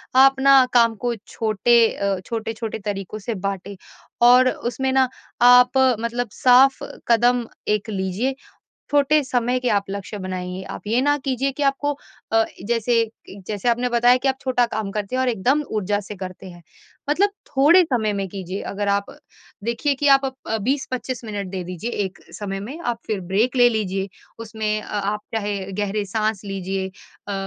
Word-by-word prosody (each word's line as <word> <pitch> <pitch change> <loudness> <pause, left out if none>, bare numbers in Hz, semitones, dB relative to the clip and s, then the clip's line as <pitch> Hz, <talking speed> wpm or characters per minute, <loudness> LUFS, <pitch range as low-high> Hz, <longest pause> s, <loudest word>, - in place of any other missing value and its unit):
आप 270 +1 +6
ना 275 -1 +7
काम 230 -2 +4
को 240 -1 +1
छोटे 225 +2 +2 0.2
अ, 200 -1 -1
छोटे-छोटे 225 -1 -4
तरीकों 200 0 -4
से 220 +2 -4
बाँटे 195 0 -5 0.4
और 250 +2 +7
उसमें 265 +2 -2
न 260 -1 +5 0.3
आप 245 +1 +7 0.2
मतलब 235 0 -2
साफ 260 +2 +5 0.3
कदम 240 +1 +3 0.2
एक 210 +1 0
लीजिए, 195 +7 -2 0.6
छोटे 290 +1 +3
समय 250 0 0
के 250 - -1
आप 200 -2 +2
लक्ष्य 200 +1 -6
बनाइए। 185 -1 -5
आप - - -7
ये 230 +3 +2
ना 290 +1 +3
कीजिए 270 0 0
कि 290 - -5
आपको 280 +1 +1 0.4
अ, 225 0 +4 0.2
जैसे 230 0 +2 0.2
कि 195 0 -11
जैसे 210 +2 -2
आपने 245 +1 0
बताया 240 +1 +5
कि 270 - -1
आप 265 0 0
छोटा 245 -2 +2
काम 220 -3 -4
करते 210 +2 -4
हैं 260 - +1
और 260 - +1
एकदम 250 +7 +1
ऊर्जा 205 -1 -1
से 210 +1 -8
करते 185 0 -8
हैं, 175 -1 -14 0.5
मतलब 395 +7 +3 0.2
थोड़े 300 +7 +5
समय 230 -8 0
में 195 -1 -2
कीजिए, 190 0 -6
अगर 205 0 -3
आप 200 0 +1 0.6
देखिए 235 +5 0
कि 290 +2 +1
आप 275 0 +5
ब 260 -4 -4
20-25 255 -1 -2
मिनट 205 -3 -4
दे 185 -1 -4
दीजिए 180 +6 -5
एक 190 -2 -7 0.2
समय 195 -2 -4
में 250 +11 -7
आप 240 -1 -1
फिर 215 -3 -2
ब्रेक 205 +8 0
ले 245 -1 +6
लीजिए। 195 -4 -2 0.3
उसमें 215 -1 -3
अ, - - -12
आप 205 +1 -2
चाहे 205 -2 -1 0.2
गहरे 205 +1 -2
साँस 215 0 -1
लीजिए 190 -1 -3 0.4
अ, - - -2
225 Hz, 175 wpm, -22 LUFS, 200-255 Hz, 0.6 s, ना